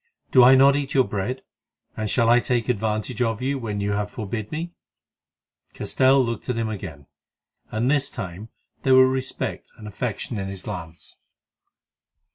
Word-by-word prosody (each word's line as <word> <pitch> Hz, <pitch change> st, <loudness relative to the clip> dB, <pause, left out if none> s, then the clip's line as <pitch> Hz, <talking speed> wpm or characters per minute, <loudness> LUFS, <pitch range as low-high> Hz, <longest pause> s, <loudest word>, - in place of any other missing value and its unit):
Do 130 Hz, -, +7 dB
I 130 Hz, +2 st, +8 dB
not 135 Hz, +1 st, +6 dB
eat 140 Hz, -1 st, -3 dB
your 130 Hz, -, +6 dB
bread? 110 Hz, +5 st, -4 dB, 0.5 s
and 110 Hz, -1 st, -3 dB
shall 115 Hz, +1 st, +2 dB
I 120 Hz, +1 st, +6 dB
take 120 Hz, -2 st, -1 dB
advantage 110 Hz, +1 st, -1 dB
of 115 Hz, -3 st, 0 dB
you 135 Hz, +2 st, -1 dB
when 105 Hz, -4 st, -4 dB
you 100 Hz, 0 st, -1 dB
have 105 Hz, 0 st, -1 dB
forbid 110 Hz, -1 st, -5 dB
me?" 170 Hz, +3 st, -4 dB, 1.0 s
Castell 130 Hz, 0 st, +3 dB
looked 115 Hz, +1 st, -5 dB
at 125 Hz, -, -1 dB
him 115 Hz, -1 st, -1 dB
again, 80 Hz, -9 st, -7 dB, 0.6 s
and 120 Hz, +5 st, 0 dB
this 140 Hz, -1 st, +1 dB
time 100 Hz, -2 st, -7 dB, 0.3 s
there 130 Hz, -1 st, +4 dB
were 130 Hz, 0 st, +7 dB
respect 130 Hz, 0 st, -4 dB
and 105 Hz, -, -10 dB
affection 110 Hz, +1 st, -4 dB
in 95 Hz, -, -4 dB
his 95 Hz, -1 st, -7 dB
glance. 85 Hz, -5 st, -8 dB
115 Hz, 165 wpm, -23 LUFS, 105-130 Hz, 1.0 s, I